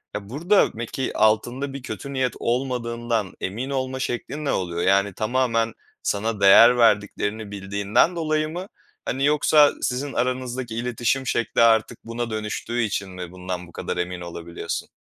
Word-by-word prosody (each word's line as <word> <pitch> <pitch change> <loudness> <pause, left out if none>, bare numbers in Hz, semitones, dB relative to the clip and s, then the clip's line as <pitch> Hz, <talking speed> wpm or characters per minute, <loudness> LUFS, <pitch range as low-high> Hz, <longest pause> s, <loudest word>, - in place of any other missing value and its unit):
Ya, 100 -1 -6
burada 170 - +3
peki 120 +3 -4
altında 120 +6 +1
bir 140 - -6
kötü 125 +4 -6
niyet 130 -3 0
olmadığından 120 -4 -1
emin 115 +8 -3
olma 130 -1 -2
şeklin 130 +4 -3
ne - - +1
oluyor? 85 -2 -2
Yani, 100 +1 +3
tamamen 115 +1 0 0.3
sana 105 +1 -1
değer 115 +5 +8
verdiklerini 105 -1 +1
bildiğinden 100 - +1
dolayı 155 -2 0
mı? 180 +4 -6 0.4
Hani, 135 +2 0
yoksa 150 0 +5
sizin 135 +2 -2
aranızdaki 125 -1 -2
iletişim 125 +2 -1
şekli 120 -1 +1
artık 115 0 +4
buna 115 +1 -4
dönüştüğü 110 +2 -3
için 100 -2 -2
mi 90 -1 -7
bundan 90 -1 -6
bu - - -16
kadar - - -4
emin 90 0 -3
olabiliyorsun? 85 0 -5
115 Hz, 150 wpm, -23 LUFS, 100-130 Hz, 0.4 s, değer